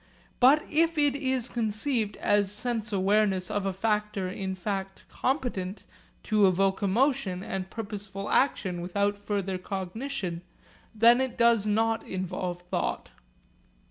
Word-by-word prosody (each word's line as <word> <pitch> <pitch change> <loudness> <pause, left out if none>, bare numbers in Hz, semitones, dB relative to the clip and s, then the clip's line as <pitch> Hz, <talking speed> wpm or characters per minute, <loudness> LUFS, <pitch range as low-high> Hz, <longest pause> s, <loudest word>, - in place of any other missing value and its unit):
But 275 +5 +6
if 330 +1 +2
it 290 -2 +3
is 260 -3 0
conceived 220 -1 -1
as 205 -1 +2
sense 225 0 -2
awareness 195 -1 +2
of 205 -1 -1
a - - +1
factor 210 -1 -1
in 190 0 -4
fact 195 0 -4
competent 235 -8 -2 0.4
to 210 -3 +4
evoke 190 +2 +1
emotion 205 -2 +1
and 190 -1 -4
purposeful 200 -2 -6
action 190 -10 +1
without 200 +3 -1
further 195 -2 -2
cognition, 190 0 -4 0.5
then 235 +3 +6
it 260 -2 -3
does 235 -3 +4
not 225 +2 +1
involve 180 -1 -4
thought. 180 - -3
205 Hz, 125 wpm, -28 LUFS, 190-235 Hz, 0.5 s, But